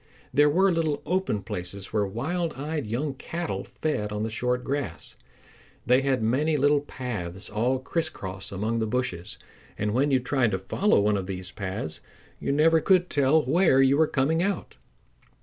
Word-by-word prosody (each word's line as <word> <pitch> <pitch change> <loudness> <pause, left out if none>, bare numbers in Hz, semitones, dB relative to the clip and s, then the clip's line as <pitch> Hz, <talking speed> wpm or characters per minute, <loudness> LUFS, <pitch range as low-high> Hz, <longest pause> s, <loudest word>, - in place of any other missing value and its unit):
There 145 +1 +5
were 190 +5 +4
little 160 -4 0
open 180 - 0
places 95 +1 -6
where 105 -2 +1
wild 160 - -2
eyed 145 -2 -4
young 135 +6 -2
cattle 170 +5 -4
fed 105 -10 -3
on 105 0 -2
the 110 - -2
short 125 +2 -1
grass. 140 +1 -4 0.7
They 125 +3 +4
had 135 -4 +1
made 115 +5 +2
many 155 0 +1
little 145 +1 +3
paths 105 -10 -5
all 120 +5 +1
crisscross 100 - -4
among 110 +4 -1
the 110 - 0
bushes, 105 -6 -3 0.4
and 105 0 -1
when 135 +5 +2
you 135 -2 +3
tried 125 -1 +1
to - - +2
follow 100 - +2
one 105 0 +2
of 95 -1 -4
these 95 -1 -5
paths 95 -5 -5 0.4
you - - -1
never 160 +3 +4
could 180 +1 +3
tell 145 +2 +3
where 170 -7 +4
you 135 +1 +5
were 155 +1 +4
coming 150 +5 +1
out. 200 +2 -2
130 Hz, 175 wpm, -26 LUFS, 105-150 Hz, 0.7 s, There